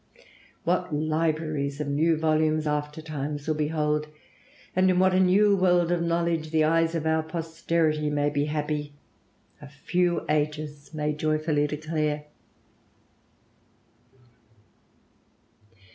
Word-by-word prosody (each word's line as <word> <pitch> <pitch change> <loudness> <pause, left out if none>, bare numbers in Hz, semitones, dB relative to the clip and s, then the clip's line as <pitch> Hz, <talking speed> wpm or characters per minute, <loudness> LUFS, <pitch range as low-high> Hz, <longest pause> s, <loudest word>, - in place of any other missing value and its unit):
What 180 0 0
libraries 155 -2 -1
of 150 - -2
new 155 +3 +2
volumes 155 0 +1
after 150 +1 -2
times 145 -1 -5
will 155 - +2
behold, 150 0 0 0.7
and 185 +1 +4
in 180 - +2
what 185 0 +4
a 185 - +3
new 200 +2 +4
world 180 -2 +3
of 175 -1 +1
knowledge 170 -1 0
the 155 0 +2
eyes 165 +1 +2
of 160 -1 -2
our 160 0 +2
posterity 160 -1 -1
may 145 0 0
be 145 0 0
happy, 150 -1 -3 0.7
a 145 - -10
few 175 +5 -1
ages 150 -1 -2
may 150 -1 -1
joyfully 155 -1 0
declare." 150 0 -2
155 Hz, 115 wpm, -26 LUFS, 150-165 Hz, 0.7 s, and